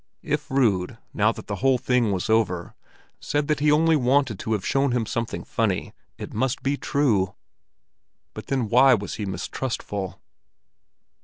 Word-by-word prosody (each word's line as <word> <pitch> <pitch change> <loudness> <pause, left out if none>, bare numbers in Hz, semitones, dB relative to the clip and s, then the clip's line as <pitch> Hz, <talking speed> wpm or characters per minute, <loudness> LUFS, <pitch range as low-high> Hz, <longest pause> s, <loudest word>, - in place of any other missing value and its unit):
If - - -2
Rud, 110 -6 +1 0.2
now 110 +1 +3
that - - -9
the 100 - -4
whole 130 +2 +3
thing 125 -3 +1
was 95 -2 -2
over, 105 -6 +1 0.5
said 145 0 -1
that 150 -2 +1
he 150 +1 +3
only 160 +2 +4
wanted 130 -5 +2
to 110 - -2
have 105 -3 -2
shown 135 -2 +1
him 120 -2 0
something 115 +1 -3
funny, - - -1 0.2
it - - -8
must 130 +3 -1
be 140 +1 +1
true. 110 -11 +1 1.0
But - - -9
then 130 -5 0
why 130 +3 +6
was 100 -2 -5
he 100 - -2
mistrustful? 100 -2 -4
120 Hz, 160 wpm, -24 LUFS, 105-135 Hz, 1.0 s, why